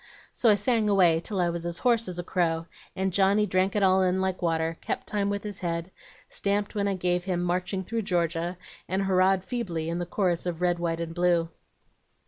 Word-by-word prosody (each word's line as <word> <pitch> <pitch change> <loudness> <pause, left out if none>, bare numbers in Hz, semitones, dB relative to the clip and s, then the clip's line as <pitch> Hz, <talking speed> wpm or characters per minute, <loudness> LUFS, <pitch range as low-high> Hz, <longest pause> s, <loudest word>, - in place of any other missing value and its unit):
"So 235 - +3
I 210 - +6
sang 215 +1 +1
away 180 -5 +4
till 195 +3 -4
I 175 -1 +2
was 170 0 -4
as 170 0 -4
hoarse 230 -3 +2
as 180 -1 -5
a 175 - -3
crow, 165 -2 0 0.3
and 190 -1 -1
Johnny 200 +2 +3
drank 185 0 +1
it 205 - +2
all 190 0 +4
in 185 0 +2
like 190 -1 -1
water; 165 -1 0
kept - - -3
time 200 -1 -1
with 200 0 -2
his 210 -1 -6
head, 170 0 -3 0.4
stamped 200 0 -1
when 200 -1 0
I 200 - 0
gave 180 -1 0
him 180 -2 -1
'Marching 180 +2 -1
through 225 +4 -2
Georgia,' 175 -2 -1 0.3
and 190 +1 0
hurrahed 190 0 +3
feebly 180 -10 -3
in 170 +1 -2
the 175 - -3
chorus 180 -2 0
of 170 -2 -3
'Red, 175 -1 +1
White, 170 -1 -1
and 165 0 -4
Blue.' 175 -1 +2
185 Hz, 215 wpm, -27 LUFS, 170-200 Hz, 0.4 s, I